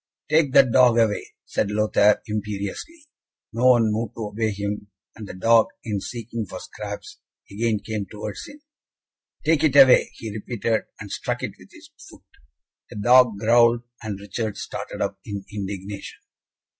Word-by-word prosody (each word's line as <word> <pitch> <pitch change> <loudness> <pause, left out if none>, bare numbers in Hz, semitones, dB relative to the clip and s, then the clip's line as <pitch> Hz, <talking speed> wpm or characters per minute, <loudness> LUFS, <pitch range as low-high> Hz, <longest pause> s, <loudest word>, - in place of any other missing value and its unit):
"Take 155 -3 +3
that 135 -3 +6
dog 125 -1 +5
away," 110 -3 +1 0.2
said 100 - -1
Lothaire, 105 0 +3
imperiously. 105 - -5 0.5
No 120 +3 +2
one 120 -4 +5
moved 110 0 -3
to 110 -2 -4
obey 110 +1 -1
him, 100 0 -4 0.3
and 110 -2 -9
the - - -8
dog, 115 +4 +4 0.2
in 105 -3 -3
seeking 115 -1 -5
for 90 +1 -8
scraps, 105 +1 -8 0.3
again 110 +1 0
came 105 -3 -3
towards 105 +1 -7
him. 290 0 -14 0.8
"Take 160 -1 +3
it 145 -3 +3
away," 135 -2 +7
he 110 - -7
repeated, 110 +1 -2
and 100 -1 -9
struck - - -3
it - - -2
with - - -16
his - - -16 0.2
foot. - - -16 0.7
The - - -11
dog 120 +1 +5
growled, 115 +2 +4 0.2
and 105 -3 -5
Richard 105 +1 -4
started - - -5
up - - -4
in 100 -2 -6
indignation. 100 0 -6
110 Hz, 155 wpm, -23 LUFS, 105-120 Hz, 0.8 s, away